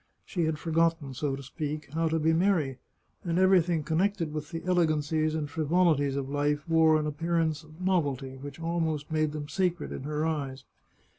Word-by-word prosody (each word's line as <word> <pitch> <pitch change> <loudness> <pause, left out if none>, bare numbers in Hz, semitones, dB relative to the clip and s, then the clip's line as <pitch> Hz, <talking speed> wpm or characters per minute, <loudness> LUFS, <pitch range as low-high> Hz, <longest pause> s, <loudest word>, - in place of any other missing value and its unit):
She 175 -5 -1
had 160 -1 0
forgotten, 165 -3 +1
so 135 +2 -1
to 140 - -8
speak, 150 +1 -5
how 165 +1 +1
to 160 0 +1
be 160 +1 +2
merry, 160 -7 +1 0.4
and 170 -1 -1
everything 180 -4 +4
connected 170 0 0
with 150 -1 -4
the 165 - -5
elegancies 155 -3 +1
and 155 -2 -2
frivolities 155 -2 +2
of 140 -1 -2
life 145 +2 0
wore 160 -1 +5
an 150 - -2
appearance 160 0 0
of 155 +2 -16
novelty 145 -8 0
which 145 +3 -9
almost 165 -3 -2
made 155 -1 +1
them 150 -1 -5
sacred 180 +1 -1
in - - -5
her 150 +2 -2
eyes. 140 -4 -3
155 Hz, 175 wpm, -28 LUFS, 145-165 Hz, 0.4 s, wore